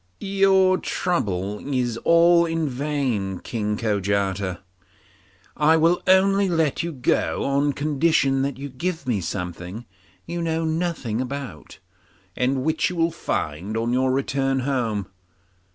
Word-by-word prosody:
'Your 195 Hz, -1 st, +3 dB
trouble 105 Hz, -, -2 dB
is 125 Hz, -3 st, 0 dB
all 170 Hz, +4 st, +5 dB
in 165 Hz, -1 st, -1 dB
vain, 130 Hz, -8 st, -2 dB
King 105 Hz, +1 st, -3 dB
Kojata; 100 Hz, -3 st, -1 dB, 0.9 s
I 155 Hz, +2 st, +4 dB
will 165 Hz, +2 st, +3 dB
only 195 Hz, +1 st, +4 dB
let 160 Hz, -4 st, +1 dB
you 170 Hz, 0 st, -3 dB
go 130 Hz, -5 st, 0 dB
on 140 Hz, +1 st, +1 dB
condition 145 Hz, -1 st, +1 dB
that 140 Hz, 0 st, -2 dB
you 140 Hz, +1 st, -6 dB
give 160 Hz, +4 st, -4 dB
me 115 Hz, -6 st, 0 dB
something 90 Hz, +4 st, -5 dB, 0.4 s
you 170 Hz, +1 st, -4 dB
know 165 Hz, 0 st, -1 dB
nothing 160 Hz, -8 st, -2 dB
about, 130 Hz, -, -7 dB, 0.6 s
and 130 Hz, +1 st, 0 dB
which 160 Hz, +2 st, +1 dB
you 180 Hz, -, -5 dB
will 165 Hz, 0 st, +1 dB
find 95 Hz, -, -3 dB
on 115 Hz, +2 st, 0 dB
your 130 Hz, +1 st, +2 dB
return 135 Hz, 0 st, 0 dB
home. 120 Hz, -7 st, -1 dB
135 Hz, 130 wpm, -23 LUFS, 110-165 Hz, 0.9 s, all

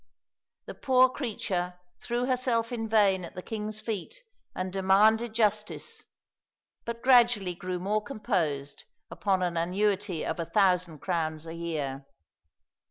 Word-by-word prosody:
The -, -, -7 dB
poor 260 Hz, -2 st, +4 dB
creature 185 Hz, -9 st, -3 dB, 0.2 s
threw 240 Hz, +1 st, -2 dB
herself 250 Hz, -3 st, 0 dB
in 225 Hz, -2 st, -3 dB
vain 200 Hz, -4 st, +3 dB
at 170 Hz, -, -9 dB
the 180 Hz, -, -6 dB
king's 215 Hz, -1 st, -4 dB
feet 225 Hz, -, -5 dB, 0.3 s
and 185 Hz, 0 st, -3 dB
demanded 215 Hz, +4 st, +3 dB
justice, 210 Hz, -2 st, -1 dB, 0.8 s
but 235 Hz, 0 st, -5 dB
gradually 240 Hz, -7 st, +5 dB
grew 180 Hz, +1 st, -4 dB
more 205 Hz, +4 st, 0 dB
composed 175 Hz, -, -2 dB, 0.3 s
upon 190 Hz, -3 st, 0 dB
an 175 Hz, -1 st, -1 dB
annuity 190 Hz, +1 st, 0 dB
of -, -, -3 dB
a 165 Hz, -, -1 dB
thousand 180 Hz, -5 st, +1 dB
crowns 160 Hz, -3 st, -2 dB
a 165 Hz, -, -7 dB
year. 145 Hz, -5 st, -4 dB
200 Hz, 130 wpm, -28 LUFS, 175-225 Hz, 0.8 s, gradually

